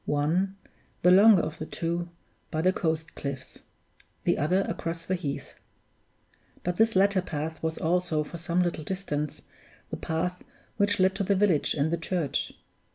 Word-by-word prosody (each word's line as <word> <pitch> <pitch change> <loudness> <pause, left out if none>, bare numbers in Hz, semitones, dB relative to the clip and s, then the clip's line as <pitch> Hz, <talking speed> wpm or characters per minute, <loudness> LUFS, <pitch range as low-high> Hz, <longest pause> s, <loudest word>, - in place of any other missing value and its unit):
One, 165 +7 +1 0.5
the 180 - +7
longer 200 -1 +7
of 155 - -4
the 155 - -5
two, 170 +1 -2 0.4
by 155 +1 -1
the 185 +1 +4
coast 160 -2 -1
cliffs; 140 -2 -6 0.6
the - - +3
other 180 +7 +2
across 165 -3 -4
the 185 - -1
heath. 145 -6 -4 1.1
But 180 0 -1
this 225 -1 +3
latter 195 0 +4
path 160 -1 -4
was 160 0 -2
also, 170 -2 +1
for 170 +3 -8
some 175 +2 +1
little 170 -3 -2
distance, 150 -5 -3 0.5
the - - -3
path 180 +3 -2 0.4
which 205 -1 +2
led 190 +1 +4
to 200 - 0
the 200 +1 +2
village 185 -6 +2
and 150 +1 +1
the 170 - +1
church. 165 -3 -1
170 Hz, 160 wpm, -28 LUFS, 155-185 Hz, 1.1 s, the